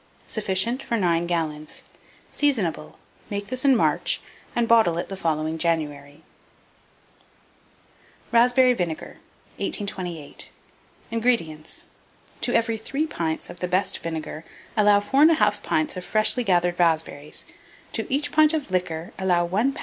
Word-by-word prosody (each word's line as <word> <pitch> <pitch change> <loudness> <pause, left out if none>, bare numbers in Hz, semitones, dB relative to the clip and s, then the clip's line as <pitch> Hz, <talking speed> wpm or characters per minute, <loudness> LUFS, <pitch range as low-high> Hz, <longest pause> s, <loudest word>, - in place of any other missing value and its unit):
Sufficient 215 +4 0
for 235 - -2
9 170 -3 +1
gallons. 155 -3 -3 0.5
Seasonable. 215 - 0 0.3
Make 200 0 -3
this 255 +1 -2
in 275 -2 +5
March, - - +1 0.4
and 235 -1 +1
bottle 220 -8 +4
it 175 - -3
the 195 - -4
following 160 -3 -1
January. 150 -3 -2 2.1
RASPBERRY 250 +2 +5
VINEGAR. 175 -8 -4 0.4
1828. 180 -7 -4 0.6
INGREDIENTS. 220 -10 -1 0.6
To - - +1
every 230 -1 +1
3 275 +7 -2
pints 165 - -3
of 175 - -12
the 180 - -2
best 185 +2 0
vinegar 160 -1 -5 0.3
allow 205 -2 +5
4 270 +8 +3
1/2 210 -11 +3
pints 155 -5 -1
of 180 - -6
freshly 215 +5 +2
gathered 175 -3 +1
raspberries; 160 -3 0 0.5
to 225 - -3
each 290 +2 +1
pint 310 +1 +5
of 290 -10 -4
liquor 175 -2 -2
allow 180 -2 +2
1 215 +10 +1
lb. - - -10
190 Hz, 130 wpm, -24 LUFS, 165-235 Hz, 2.1 s, in